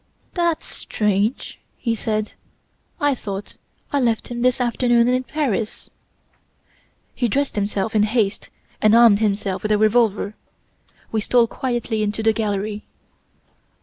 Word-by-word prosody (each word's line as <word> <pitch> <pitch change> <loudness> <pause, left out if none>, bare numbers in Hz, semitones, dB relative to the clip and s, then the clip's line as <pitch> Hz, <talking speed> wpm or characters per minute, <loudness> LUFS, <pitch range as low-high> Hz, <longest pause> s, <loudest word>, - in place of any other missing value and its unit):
"'That's 340 -2 0
strange!' 210 +3 -1 0.2
he 230 - -1
said; 215 -1 -2 0.7
'I 290 -1 +2
thought 200 -5 -6 0.4
I 285 - +3
left 230 -4 0
him 240 -1 -4
this 255 +1 +2
afternoon 240 -1 +2
in 255 +1 +1
Paris.' 250 -8 -3 1.2
"He 245 - 0
dressed 275 +5 0
himself 205 +1 -1
in 210 - +4
haste 215 -1 0 0.3
and 215 +1 +5
armed 230 -3 +7
himself 200 -3 -1
with 215 - -2
a 210 - +4
revolver. 215 -1 +2 0.8
We 220 - 0
stole 240 +2 +4
quietly 240 -2 -2
into 210 +1 -1
the 220 0 +4
gallery. 210 -1 -2
220 Hz, 130 wpm, -21 LUFS, 210-245 Hz, 1.2 s, armed